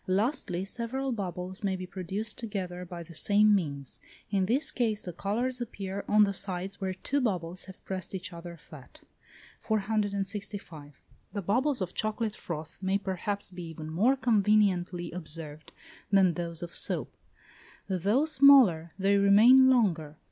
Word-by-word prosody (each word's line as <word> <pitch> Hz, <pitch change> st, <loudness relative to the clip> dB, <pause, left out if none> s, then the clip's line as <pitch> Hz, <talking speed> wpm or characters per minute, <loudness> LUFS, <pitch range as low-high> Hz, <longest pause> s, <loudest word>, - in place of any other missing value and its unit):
Lastly, 190 Hz, -, 0 dB
several 255 Hz, +5 st, -3 dB
bubbles 185 Hz, -3 st, -4 dB
may 195 Hz, -1 st, 0 dB
be 185 Hz, 0 st, -6 dB
produced 190 Hz, +4 st, -5 dB
together 185 Hz, -5 st, -5 dB
by 175 Hz, -1 st, -8 dB
the 170 Hz, -, -13 dB
same 210 Hz, +6 st, +4 dB
means; 140 Hz, -9 st, -2 dB, 0.3 s
in 195 Hz, -2 st, +1 dB
this 265 Hz, +8 st, +3 dB
case 220 Hz, -4 st, -1 dB
the 180 Hz, -, -6 dB
colours 245 Hz, +8 st, -2 dB
appear 200 Hz, -4 st, -5 dB
on 210 Hz, 0 st, +5 dB
the 200 Hz, -1 st, +1 dB
sides 190 Hz, +1 st, -3 dB
where 190 Hz, -1 st, -2 dB
two 280 Hz, +9 st, -1 dB
bubbles 180 Hz, -6 st, -2 dB
have 190 Hz, -1 st, -14 dB
pressed 190 Hz, 0 st, -5 dB
each 185 Hz, -1 st, -5 dB
other 170 Hz, 0 st, -9 dB
flat. -, -, -14 dB, 0.6 s
465. 200 Hz, -, -3 dB, 0.3 s
The 200 Hz, -, -3 dB
bubbles 250 Hz, -, +1 dB
of 180 Hz, -1 st, -3 dB
chocolate 215 Hz, 0 st, -2 dB
froth 160 Hz, -2 st, -7 dB
may 190 Hz, +1 st, +1 dB
perhaps 200 Hz, +1 st, -3 dB
be 180 Hz, -1 st, -8 dB
even 160 Hz, -1 st, -8 dB
more 220 Hz, +12 st, +3 dB
conveniently 200 Hz, -7 st, +2 dB
observed 155 Hz, -3 st, -6 dB, 0.4 s
than 190 Hz, -3 st, +5 dB
those 170 Hz, 0 st, -5 dB
of 170 Hz, -, -7 dB
soap; -, -, -2 dB, 0.7 s
though 200 Hz, -, +1 dB
smaller, 265 Hz, -, +6 dB
they 200 Hz, +1 st, +3 dB
remain 225 Hz, +7 st, +7 dB
longer. 170 Hz, -, +1 dB
195 Hz, 150 wpm, -29 LUFS, 175-215 Hz, 0.7 s, remain